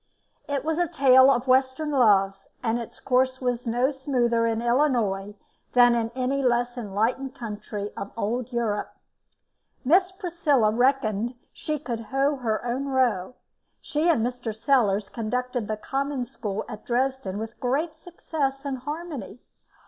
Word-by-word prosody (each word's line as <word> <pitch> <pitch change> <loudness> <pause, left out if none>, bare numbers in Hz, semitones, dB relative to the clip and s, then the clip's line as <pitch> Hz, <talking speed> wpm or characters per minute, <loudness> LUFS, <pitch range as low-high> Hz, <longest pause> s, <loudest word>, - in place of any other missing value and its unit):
It 280 -1 -1
was 320 +1 0
a 350 - +2
tale 270 -4 +6
of 250 -2 +2
western 260 +4 +2
love, 200 -7 +4 0.3
and 230 0 +1
its 230 - -9
course 260 0 +1
was 245 -1 -2
no 245 +4 +2
smoother 245 -4 +1
in 225 -1 0
Illinois 235 -6 +1 0.4
than 245 -1 +6
in 230 -1 0
any 260 +2 0
less 245 -1 +1
enlightened 240 +4 -1
country 210 -3 -5
of 200 - -6
old 235 +3 -2
Europe. 230 -4 -2 0.9
Miss 365 +7 +4
Priscilla 340 - +1
reckoned 240 -2 +1 0.2
she 305 -1 -3
could 245 -5 -4
hoe 270 +5 0
her 230 -2 -2
own 255 +3 -2
row. 250 -6 +1 0.4
She 305 +3 0
and 235 -9 +3
Mr. 245 -3 -4
Sellars 220 -5 +2
conducted 245 0 -3
the 215 - -2
Common 275 +2 -2
School 210 -3 -5
at 215 -2 -8
Dresden 255 -4 -1
with 220 +1 -6
great 295 +6 -1
success 295 -5 -4
and 270 -2 -3
harmony. 295 - -6
250 Hz, 145 wpm, -25 LUFS, 225-275 Hz, 0.9 s, tale